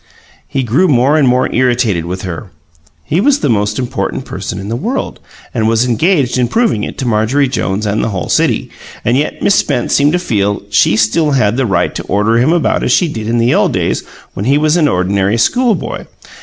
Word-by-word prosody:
He 135 - -2
grew 130 +11 +2
more 135 0 +3
and 150 -4 +3
more 125 +1 +2
irritated 120 -8 +1
with 90 +2 -5
her; 95 +2 -6 0.5
he 160 - 0
was 285 +4 +2
the 135 - +1
most 105 -1 0
important 130 +1 -3
person 95 -4 -6
in 100 +1 -6
the 115 - -3
world 230 - -3 0.3
and 110 -3 0
was 115 +2 +2
engaged 130 - +1
in 125 - +2
proving 220 - 0
it - - -6
to 130 - -3
Marjorie 120 +6 +1
Jones 105 -5 -2
and 105 +1 -1
the - - -1
whole 95 -5 -4
city, - - 0 0.3
and 120 - +2
yet 145 +3 -2
Miss 200 - +3
Spence 120 - 0
seemed 145 +2 +3
to - - +3
feel 105 - -1
she 100 - +3
still 140 +8 +1
had 110 -5 +2
the 130 -1 0
right 95 - 0
to - - -5
order 105 +4 +1
him 130 +6 +2
about 170 -1 +1
as - - 0
she 180 - +3
did 110 -8 -5
in 120 +1 0
the 115 +1 +2
old - - +2
days - - -1 0.3
when 100 - -4
he 140 +3 +3
was 155 +1 +2
an 165 -4 +3
ordinary 95 +1 0
schoolboy. 230 - 0
120 Hz, 215 wpm, -14 LUFS, 105-145 Hz, 0.5 s, more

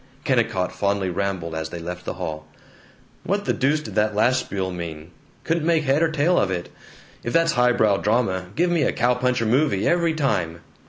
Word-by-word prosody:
Kennicott 90 -1 +1
fondly 100 0 -1
rambled 90 -3 -2
as 80 0 -4
they 85 - -6
left 90 +1 -7
the - - -4
hall: 75 -1 -5 0.8
"What 200 +2 -1
the - - +1
deuce 150 +3 +1
did - - -8
that 105 0 +1
last 125 +5 +3
spiel 95 -6 -3
mean? 85 -2 -7 0.3
Couldn't 165 -1 0
make 165 -2 +3
head 140 +2 +2
or 165 - +3
tail 160 +3 +2
of 100 - +1
it. 90 -2 -3 0.5
If 120 - -3
that's 165 -1 +3
highbrow 120 -4 +3
drama, 100 -4 0
give 175 +2 +2
me 170 -3 +2
a 135 - +1
cow 120 +1 +2
puncher 125 -1 0
movie, 125 -3 +2
every 170 -2 +2
time! 85 - -1
110 Hz, 195 wpm, -23 LUFS, 90-150 Hz, 0.8 s, last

